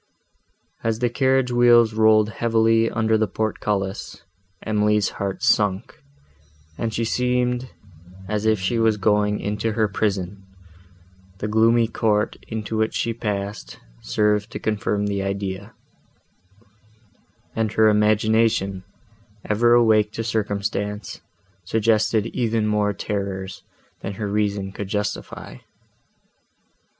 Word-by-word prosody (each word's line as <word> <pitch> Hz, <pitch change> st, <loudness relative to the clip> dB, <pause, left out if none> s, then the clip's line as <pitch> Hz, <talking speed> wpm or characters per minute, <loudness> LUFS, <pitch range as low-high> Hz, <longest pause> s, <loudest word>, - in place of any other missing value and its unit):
As 115 Hz, -1 st, 0 dB
the 120 Hz, 0 st, 0 dB
carriage 130 Hz, -1 st, +2 dB
wheels 120 Hz, -2 st, +5 dB
rolled 110 Hz, -1 st, +4 dB
heavily 115 Hz, 0 st, +2 dB
under 110 Hz, 0 st, +1 dB
the 110 Hz, -, +1 dB
portcullis, 105 Hz, -2 st, -3 dB, 0.4 s
Emily's 105 Hz, -1 st, +1 dB
heart 100 Hz, -1 st, -3 dB
sunk, 105 Hz, +5 st, +1 dB, 0.7 s
and 115 Hz, +5 st, -2 dB
she 115 Hz, +1 st, -1 dB
seemed, 125 Hz, +1 st, 0 dB, 0.6 s
as 105 Hz, +2 st, -1 dB
if 110 Hz, -2 st, +3 dB
she 105 Hz, +5 st, 0 dB
was 110 Hz, -1 st, +3 dB
going 105 Hz, 0 st, +1 dB
into 105 Hz, +2 st, -2 dB
her 110 Hz, 0 st, +2 dB
prison; 100 Hz, -1 st, -2 dB, 0.9 s
the 105 Hz, -, -3 dB
gloomy 115 Hz, +2 st, +3 dB
court, 110 Hz, -2 st, 0 dB
into 110 Hz, -1 st, -4 dB
which 110 Hz, 0 st, 0 dB
she 115 Hz, -, -1 dB
passed, 100 Hz, -, -4 dB, 0.2 s
served 105 Hz, -, 0 dB
to -, -, -5 dB
confirm 105 Hz, -1 st, -1 dB
the 100 Hz, -1 st, -1 dB
idea, 100 Hz, +1 st, -4 dB, 1.8 s
and 110 Hz, -1 st, -1 dB
her 110 Hz, 0 st, +4 dB
imagination, 105 Hz, -2 st, +2 dB, 0.6 s
ever 120 Hz, +3 st, +3 dB
awake 110 Hz, -3 st, +4 dB
to 115 Hz, -, -3 dB
circumstance, 105 Hz, -1 st, -3 dB, 0.4 s
suggested 110 Hz, +2 st, +1 dB
even 115 Hz, -2 st, -1 dB
more 105 Hz, -1 st, +1 dB
terrors, 100 Hz, -2 st, -4 dB, 0.4 s
than 100 Hz, -, -5 dB
her 105 Hz, +1 st, -4 dB
reason 100 Hz, -1 st, -1 dB
could 100 Hz, 0 st, -6 dB
justify. 105 Hz, -, -4 dB
105 Hz, 115 wpm, -22 LUFS, 100-115 Hz, 1.8 s, wheels